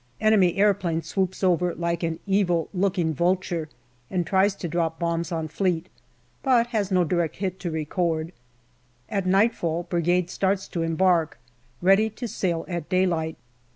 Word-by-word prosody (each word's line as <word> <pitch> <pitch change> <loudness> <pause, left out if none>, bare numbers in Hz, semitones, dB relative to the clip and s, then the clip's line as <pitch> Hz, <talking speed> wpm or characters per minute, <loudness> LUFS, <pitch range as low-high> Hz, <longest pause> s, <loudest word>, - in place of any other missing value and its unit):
Enemy 205 -5 +4
aeroplane 190 -5 +2
swoops 190 -1 -2
over 180 -1 +2
like 170 0 -2
an 165 -1 -1
evil 190 -4 +1
looking 180 -4 +1
vulture 175 -1 0 0.4
and 180 -2 -1
tries 190 +3 +2
to 175 - -5
drop 165 -1 -1
bombs 170 0 -2
on 160 -2 -2
Fleet, 180 +1 -1 0.5
but 250 -3 +3
has 205 -3 0
no 185 -2 +3
direct 170 -1 0
hit 190 -1 -3
to 175 - -3
record. 160 +1 -1 0.8
At 195 -3 -1
nightfall 185 -4 +2
Brigade 175 +1 0
starts 195 0 0
to 170 - -3
embark, 165 -1 +2 0.5
ready 195 +4 +5
to 230 +3 -6
sail 175 -5 -2
at 170 -4 -4
daylight. 170 -4 +1
180 Hz, 150 wpm, -25 LUFS, 165-190 Hz, 0.8 s, ready